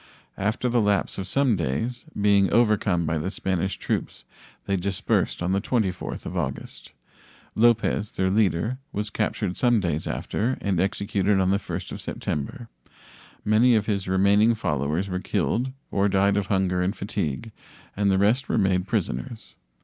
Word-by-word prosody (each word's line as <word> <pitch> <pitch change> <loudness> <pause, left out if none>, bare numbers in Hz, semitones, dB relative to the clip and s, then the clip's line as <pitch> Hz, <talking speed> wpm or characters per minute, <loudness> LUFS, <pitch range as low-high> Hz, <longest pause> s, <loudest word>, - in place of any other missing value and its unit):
After 110 +5 0
the 120 -1 +2
lapse 100 -2 0
of 95 - -4
some 135 -5 +2
days, 95 - -2
being 100 -1 +4
overcome 105 -7 +2
by 80 0 0
the 85 +5 -2
Spanish 95 -1 -2
troops, - - -3 0.4
they 100 - 0
dispersed 95 -1 -1
on 90 - 0
the 100 +1 +1
24th 105 -7 -2
of - - -5
August. - - -5 0.6
Lopez, 115 -2 +2
their 95 0 0
leader, 105 +4 +1
was 105 +1 -3
captured 90 - -1
some 120 -3 +3
days 85 -5 -2
after, 125 +5 -2
and 95 -4 -1
executed 100 0 +1
on 95 0 +2
the 100 - +3
1st - - -6
of - - -6
September. 115 - -4 0.8
Many 115 +3 +5
of 105 -2 +1
his 100 -3 -1
remaining 100 +4 +4
followers 80 -1 -1
were 90 -1 -2
killed 125 +6 -1 0.2
or 100 +1 +2
died 100 +1 +3
of 100 -2 0
hunger 95 -2 +1
and 95 +4 0
fatigue, 100 +2 -3 0.4
and 100 0 +1
the 95 - +3
rest 110 +7 +2
were - - +1
made 95 -2 +1
prisoners. 85 - -3
100 Hz, 160 wpm, -25 LUFS, 95-110 Hz, 0.8 s, Many